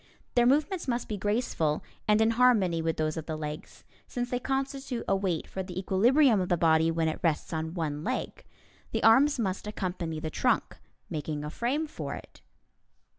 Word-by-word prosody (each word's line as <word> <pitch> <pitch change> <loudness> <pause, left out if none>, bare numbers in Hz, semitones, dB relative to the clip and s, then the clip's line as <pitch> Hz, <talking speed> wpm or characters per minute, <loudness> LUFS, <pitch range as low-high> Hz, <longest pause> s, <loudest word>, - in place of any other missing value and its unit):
Their 240 -1 +4
movements 305 +7 +1
must 240 -1 -1
be 215 - -3
graceful 205 -7 0 0.2
and 210 +1 +4
in 220 +1 +4
harmony 220 -9 +3
with 165 0 -1
those 155 0 -1
of 160 - -5
the 160 - -2
legs, 150 -1 -7 0.2
since 245 0 -4
they 245 - 0
constitute 270 -1 -3
a 195 - +3
weight 190 -5 -1
for 190 - -5
the 180 -1 -7
equilibrium 225 +5 +4
of 180 - -2
the 175 - +3
body 160 0 +4
when 165 0 0
it 155 - -2
rests 165 0 0
on 160 +1 -3
one 150 -3 -2
leg. 255 +6 -3 0.5
The - - -1
arms 275 +7 +6
must 195 -3 -2
accompany 180 -6 -3
the 155 0 -4
trunk, - - 0 0.3
making 150 -1 -4
a 150 - -5
frame 270 - -1
for 305 - -5
it. - - -13
190 Hz, 185 wpm, -29 LUFS, 160-245 Hz, 0.5 s, arms